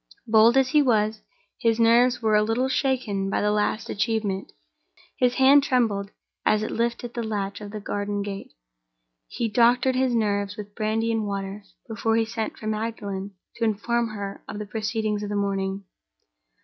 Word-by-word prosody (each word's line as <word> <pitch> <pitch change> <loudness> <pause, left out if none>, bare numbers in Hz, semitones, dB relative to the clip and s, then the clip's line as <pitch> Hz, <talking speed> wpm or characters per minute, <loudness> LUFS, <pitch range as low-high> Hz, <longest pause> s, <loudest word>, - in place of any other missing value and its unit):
Bold 225 +3 +5
as 265 -1 +4
he 300 +1 +4
was, 220 -4 +1 0.4
his 230 -1 +1
nerves 240 +2 +4
were 220 -1 +2
a 210 - +5
little 225 +4 +1
shaken 255 -8 0
by - - 0
this 210 - +1
last 210 +2 0
achievement; 210 -3 -1 0.6
his 250 0 +2
hand 270 +2 +6
trembled 220 -7 +1 0.3
as 215 0 +2
it - - -3
lifted 235 +1 -2
the 240 - -3
latch 205 -2 -3
of 205 - -7
the 215 +1 -6
garden 205 0 -3
gate. 200 -1 -6 0.8
He 235 - -2
doctored 240 +4 +3
his 255 -1 +1
nerves 205 -2 0
with 205 -1 -8
brandy 220 +2 0
and 220 -2 -1
water 200 0 -5 0.2
before 225 0 0
he 225 0 +2
sent 220 0 -4
for - - -10
Magdalen 210 -3 -4 0.2
to 230 - -2
inform 230 +2 0
her 200 -2 -6
of 210 - -6
the 210 - -5
proceedings 215 0 -2
of 205 - -4
the 205 - -2
morning. 195 -1 -1
215 Hz, 175 wpm, -25 LUFS, 205-235 Hz, 0.8 s, hand